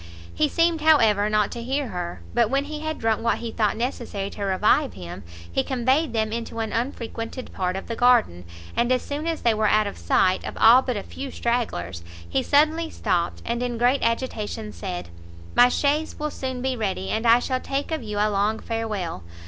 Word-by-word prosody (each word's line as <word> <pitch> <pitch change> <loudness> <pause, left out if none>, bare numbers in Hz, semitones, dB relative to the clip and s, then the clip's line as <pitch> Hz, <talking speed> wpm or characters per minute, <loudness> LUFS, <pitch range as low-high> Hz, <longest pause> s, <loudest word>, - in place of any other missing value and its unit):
He 305 -1 +2
seemed, 330 0 +2
however, 220 -10 +4
not 215 -1 +2
to 235 - -5
hear 265 +2 -2
her; 175 -2 -5
but 235 -2 +3
when 275 +1 +1
he 300 0 -6
had 315 0 -3
drunk 225 -1 0
what 230 0 +1
he 230 -1 -5
thought 215 -2 0
necessary 230 -5 -3
to - - -9
revive 210 +9 +2
him, 85 -1 -8 0.3
he 110 - +1
conveyed 260 - +1
them 220 -1 -1
into 230 0 -5
an 220 -1 -2
unfrequented 235 0 -4
part 185 -1 -1
of 195 - -5
the 230 - -4
garden, 235 - +3 0.3
and 240 +1 +1
as 255 -1 +2
soon 295 +3 -4
as 330 -1 -2
they 235 - +4
were 215 0 +1
out 215 0 +3
of 200 - -6
sight 185 - +2
of - - -6
all 235 +4 +7
but 250 -4 -2
a 200 - -4
few 275 0 -7
stragglers, 150 - -2 0.3
he 85 - 0
suddenly 315 +3 +2
stopt, 175 - -1
and, 235 +1 -2
in 245 -1 -2
great 245 +4 +3
agitation, 225 -2 -2
said, 180 - -5 0.4
"my 245 0 +6
chaise 295 +4 0
will 300 -1 -3
soon 260 -1 -4
be 260 -1 0
ready, 190 -4 -2
and 220 +2 0
I 230 +1 +8
shall 255 +1 -1
take 275 +4 -3
of 315 - -1
you 210 -2 -5
a 205 - +3
long 210 +1 +1
farewell! 215 - -3
230 Hz, 205 wpm, -24 LUFS, 210-265 Hz, 0.4 s, I